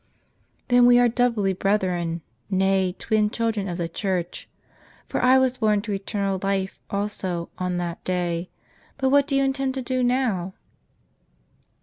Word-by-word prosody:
" - - -42
Then 245 0 +6
we 245 0 +7
are 245 0 +5
doubly 230 -5 +1
brethren, 180 -4 0 0.3
nay 190 -1 +1
twin 215 -1 +1
children 225 -3 -1
of 175 -2 -4
the 170 -2 -2
Church; 180 0 -3 0.6
for - - -2
I 255 +1 +6
was 260 -1 +2
born 210 -2 +2
to 215 - -4
eternal 195 -1 -2
life, 195 -1 -1
also, 195 -4 -3
on 180 -1 -1
that 175 -1 -4
day. 175 -1 -2 0.5
But 265 -2 +1
what 285 +1 +4
do 280 - -1
you 275 - +3
intend 270 -1 -1
to 265 - -3
do 255 +1 -1
now 245 -8 0
200 Hz, 155 wpm, -24 LUFS, 185-245 Hz, 0.6 s, we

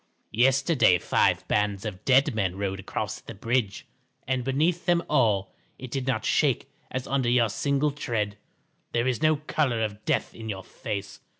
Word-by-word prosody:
Yesterday 135 - +4
five - - +1
bands 105 -1 0
of 105 -1 -6
dead 135 0 +4
men 95 -4 -1
rode 95 -1 -3
across 110 +3 -4
the 115 - -10
bridge, 115 -1 -1 0.4
and 130 -1 0
beneath 155 +7 0
them 175 -1 +3
all 105 -9 +2 0.2
it 130 -1 -9
did 135 0 -3
not 110 -4 0
shake - - +2 0.2
as 130 0 -4
under 135 -3 0
your 120 -2 +3
single 140 +6 0
tread. 110 -7 -2 0.6
There 120 0 +1
is 130 +2 0
no 155 0 +4
colour 145 -6 0
of 105 -1 -4
death - - 0
in 110 -1 -8
your 95 -2 -4
face. 100 +2 -6
120 Hz, 170 wpm, -26 LUFS, 105-135 Hz, 0.6 s, Yesterday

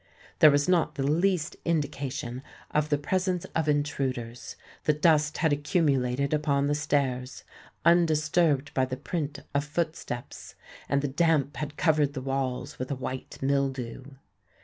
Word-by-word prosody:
There 155 - +9
was 145 0 +2
not 180 -2 +2
the 135 - -1
least 170 +2 +1
indication 140 -6 -2 0.3
of 150 0 +1
the 145 - +2
presence 185 +3 -1
of 160 -2 +1
intruders: 130 -5 -2 0.3
the 150 - +4
dust 150 -1 +3
had 160 -3 +2
accumulated 140 -3 +1
upon 145 -2 +1
the 145 - +1
stairs, 135 -3 -1 0.4
undisturbed 160 -3 +3
by 130 - +2
the 130 0 -5
print 145 -1 -4
of 140 0 +1
footsteps; 150 -5 -4 0.3
and 140 0 +1
the - - +1
damp 145 -2 +1
had 150 +2 -5
covered 150 -4 +2
the 135 - -4
walls 135 -1 -3
with 130 - -4
a 140 - -1
white 130 0 -6
mildew. 135 -3 -1
145 Hz, 145 wpm, -28 LUFS, 135-155 Hz, 0.4 s, There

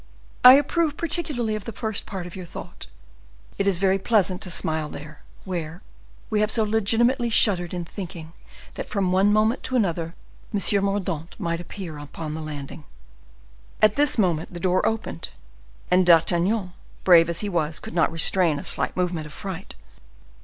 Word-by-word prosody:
I 250 - +11
approve 295 +2 +2
particularly 295 -9 -1
of 215 -1 -5
the 230 - -5
first 220 -1 -4
part 190 -4 -5
of 175 - -9
your 185 -2 -8
thought; - - -9 0.7
it 200 - +1
is 195 -3 +2
very 190 +1 +2
pleasant 195 -3 +1
to 185 - -4
smile 160 -3 0
there 150 +1 -10 0.2
where 175 -1 -5 0.5
we 215 - +1
have 210 0 +2
so 220 0 +1
legitimately 230 +4 +1
shuddered 185 -6 +3
in 175 -2 -4
thinking 170 -3 -8 0.4
that - - -7
from 195 -3 0
one 195 +2 +3
moment 215 +4 +2
to 260 - -3
another 170 -7 -1 0.4
M. 200 -1 0
Mordaunt 190 -5 -2
might 170 0 -2
appear 175 -4 -8
upon 150 +1 -7
the 160 - -5
landing." 150 0 -7 1.0
At 215 -1 +4
this 290 -2 +3
moment 175 -4 0
the - - -5
door 185 +1 +1
opened, 220 -6 -4 0.6
and 185 +1 +5
D'Artagnan, 180 +3 +3 0.3
brave 170 -2 +6
as 170 - -3
he 210 - -3
was, 160 -5 -1
could - - -9
not 165 -1 +2
restrain 165 -1 +4
a - - -7
slight - - -1
movement 175 -4 -1
of 150 - -12
fright. 190 - -7
185 Hz, 170 wpm, -24 LUFS, 165-215 Hz, 1.0 s, I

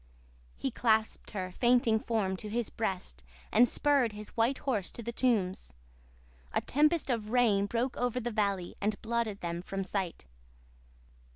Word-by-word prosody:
"He 270 - -2
clasped 220 -2 +1
her 185 -3 -4
fainting 240 0 +3
form 215 -5 0
to 210 - -7
his 230 0 -2
breast 185 - -3 0.3
and 240 +2 +6
spurred 280 -7 +2
his 210 0 -7
white 235 +4 +2
horse 220 -9 -1
to 235 - -8
the 235 - -3
tombs. 205 - 0 0.8
A - - +1
tempest 300 +1 +2
of 220 -3 -2
rain 220 -5 +3
broke 240 +4 -1
over 245 0 0
the 240 0 -3
valley 200 -5 0
and 210 0 0
blotted 225 -3 -1
them 170 0 -3
from 195 +2 -4
sight. 190 - -3
220 Hz, 155 wpm, -31 LUFS, 195-240 Hz, 0.8 s, and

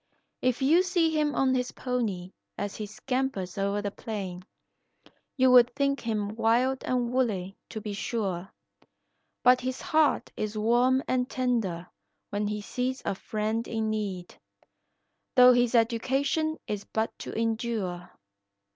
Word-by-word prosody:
If 255 +1 +1
you 320 +6 +5
see 350 -3 +2
him 300 -1 +1
on 265 -1 +3
his 250 -1 -1
pony 215 -8 -2 0.3
as 205 -1 -3
he 215 - -4
scampers 250 -4 -3
o'er 200 +1 -1
the 205 - -2
plain, 195 -5 -6 0.9
You 260 -1 +5
would 245 -1 +6
think 275 -1 +1
him 215 -2 -2
wild 245 +4 +2
and 245 -1 0
woolly, 200 -7 0
to 220 - -6
be 210 0 -5
sure; 195 -3 -3 0.9
But 250 0 +6
his 255 +1 -3
heart 310 -1 +2
is 215 0 -3
warm 245 +5 +3
and 255 0 0
tender 225 -10 -1 0.5
when 205 +1 -1
he 210 0 -3
sees 255 +5 -3
a - - 0
friend 215 +3 -2
in 220 -1 -1
need, 195 -5 -4 1.0
Though 250 -1 +8
his 245 0 +2
education 265 +7 +1
is 205 -1 -4
but 220 +2 -2
to - - -6
endure. 225 -6 -2
230 Hz, 140 wpm, -28 LUFS, 205-255 Hz, 1.0 s, Though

